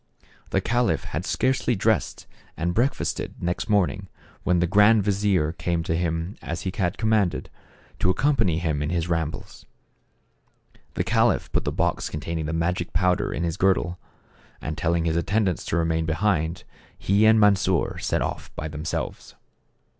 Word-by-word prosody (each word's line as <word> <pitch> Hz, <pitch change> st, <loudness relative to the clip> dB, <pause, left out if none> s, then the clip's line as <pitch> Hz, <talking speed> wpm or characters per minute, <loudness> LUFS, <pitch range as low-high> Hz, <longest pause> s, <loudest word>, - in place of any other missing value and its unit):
The -, -, +1 dB
caliph 120 Hz, 0 st, +1 dB
had -, -, -4 dB
scarcely 130 Hz, -2 st, +1 dB
dressed 110 Hz, -2 st, 0 dB, 0.3 s
and 85 Hz, +2 st, -1 dB
break 125 Hz, +7 st, +2 dB
fasted, -, -, -3 dB
next 90 Hz, +4 st, -2 dB
morning, 95 Hz, -1 st, +1 dB, 0.3 s
when 90 Hz, -, +2 dB
the 85 Hz, -, +2 dB
grand 105 Hz, +4 st, +5 dB
vizier 95 Hz, -5 st, +1 dB
came 85 Hz, 0 st, -2 dB
to 80 Hz, -, -1 dB
him 85 Hz, +2 st, -2 dB
as 85 Hz, 0 st, -4 dB
he 95 Hz, -, -2 dB
had 90 Hz, -2 st, -1 dB
commanded, 110 Hz, -5 st, +1 dB, 0.5 s
to -, -, +2 dB
accompany 110 Hz, -, +2 dB
him 80 Hz, -3 st, -1 dB
in 75 Hz, -, -1 dB
his 85 Hz, -1 st, -1 dB
rambles. 80 Hz, -3 st, -4 dB, 1.3 s
The -, -, 0 dB
caliph -, -, +1 dB
put -, -, 0 dB
the -, -, 0 dB
box -, -, -1 dB
contain 80 Hz, +2 st, -4 dB
ing 80 Hz, -, -3 dB
the -, -, -2 dB
magic 85 Hz, +1 st, -1 dB
powder 90 Hz, +3 st, +1 dB
in -, -, -2 dB
his 85 Hz, +1 st, -2 dB
girdle, 90 Hz, -2 st, +1 dB, 0.6 s
and 75 Hz, -, -4 dB
telling 85 Hz, +1 st, 0 dB
his 80 Hz, -1 st, +1 dB
attendants 95 Hz, +1 st, 0 dB
to 80 Hz, -, -1 dB
remain 80 Hz, -1 st, 0 dB
behind, 85 Hz, 0 st, 0 dB, 0.3 s
he 100 Hz, +3 st, +3 dB
and 110 Hz, 0 st, +6 dB
Mansor 100 Hz, -4 st, +2 dB
set -, -, 0 dB
off -, -, -5 dB
by 80 Hz, -, -4 dB
themselves. 75 Hz, +1 st, -5 dB
90 Hz, 160 wpm, -24 LUFS, 80-100 Hz, 1.3 s, and